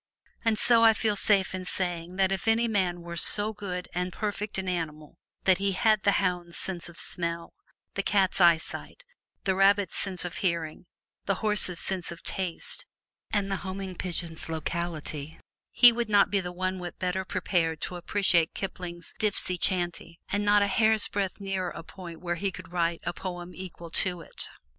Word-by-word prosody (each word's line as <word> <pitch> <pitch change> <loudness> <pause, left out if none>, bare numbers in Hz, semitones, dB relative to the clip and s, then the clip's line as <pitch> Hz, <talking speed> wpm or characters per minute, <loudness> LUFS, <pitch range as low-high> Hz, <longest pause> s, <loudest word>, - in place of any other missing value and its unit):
And 225 -2 +2
so 230 0 +4
I 225 -1 +8
feel 215 -1 +1
safe 195 -2 +3
in 185 0 -3
saying 175 -1 -2
that 190 0 +2
if 195 +3 -2
any 225 +1 +3
man 185 -5 0
were 170 0 -7
so 210 +5 +2
good 185 -4 -5
and 180 +1 -1
perfect 210 +1 -3
an 190 -1 -3
animal 155 -4 -4 0.2
that 190 -1 +4
he 200 0 +1
had 215 +2 +3
the 200 - +3
hound's 180 -3 -1
sense 175 -3 -3
of 175 - -13
smell, 170 -1 -2 0.4
the 200 - 0
cat's 195 -1 +2
eyesight, 170 - +2 0.4
the 190 - +2
rabbit's 195 0 +3
sense 185 -3 -2
of 175 - -4
hearing, 170 -2 -2 0.4
the 195 - +2
horse's 210 -4 +4
sense 185 -3 -2
of 170 - -10
taste, 185 -3 -3 0.4
and 200 -2 0
the 195 - 0
homing 190 0 -5
pigeon's 170 -3 -5
"locality," 160 -2 -4 0.3
he 245 -1 +8
would 235 -1 -2
not 205 -2 +5
be 200 -1 +2
one 185 +1 -3
whit 175 -1 -7
better 185 +1 -1
prepared 175 -4 0
to 180 - -4
appreciate 175 -2 +2
Kipling's 175 -3 -6
"Dipsy 200 -3 +1
Chanty," 175 -1 0
and 205 +1 0
not 205 0 +5
a - - +2
hair's 220 +1 +4
breadth 195 -2 -2
nearer 190 -2 -2
a 165 - -8
point 170 -2 -10
where 175 -1 -2
he 200 - +1
could 180 -1 -10
write 170 -1 0
a 175 - -2
poem 175 -1 -6
equal 175 -2 -9
to 180 -1 +4
it. - - -3
185 Hz, 180 wpm, -28 LUFS, 175-200 Hz, 0.4 s, I